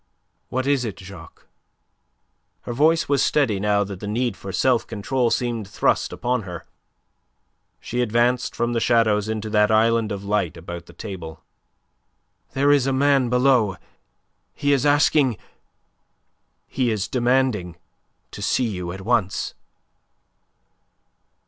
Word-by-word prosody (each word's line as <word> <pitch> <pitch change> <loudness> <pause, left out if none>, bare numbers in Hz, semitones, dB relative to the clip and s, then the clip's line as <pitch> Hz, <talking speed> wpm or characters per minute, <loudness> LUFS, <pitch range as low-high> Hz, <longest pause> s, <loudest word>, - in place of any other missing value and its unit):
"What 130 +1 -2
is 140 -2 +1
it, 110 -5 -5
Jacques!" 95 -4 -13 1.2
Her 120 - -6
voice 160 +6 +3
was 140 -2 +2
steady 130 -10 +1
now 105 0 +2
that 100 -2 -7
the 105 - -6
need 120 +3 -1
for 95 - -8
self 125 +3 +1
control 115 +3 -1
seemed 115 -4 -2
thrust 100 - 0
upon 125 0 -1
her. 90 -4 -8 1.1
She 120 +1 -3
advanced 120 +2 +1
from 120 +1 -1
the 115 - +1
shadows 110 -3 +2
into 110 -1 -3
that 105 -1 +3
island 115 0 +2
of 100 -1 -5
light 100 -4 -1
about 85 +1 -8
the - - -14
table. 85 -6 -8 1.1
"There 140 +2 +3
is 140 -2 +3
a - - +1
man 135 -2 +3
below. 125 -5 +3 0.8
He 145 0 +1
is 140 +1 +2
asking... 145 -4 +3 1.3
he 125 -3 -1
is 105 -2 -1
demanding 120 -8 0 0.6
to - - -9
see 130 - +1
you 90 -4 -5
at 95 +2 -8
once." 105 -2 0
115 Hz, 135 wpm, -22 LUFS, 100-130 Hz, 1.3 s, voice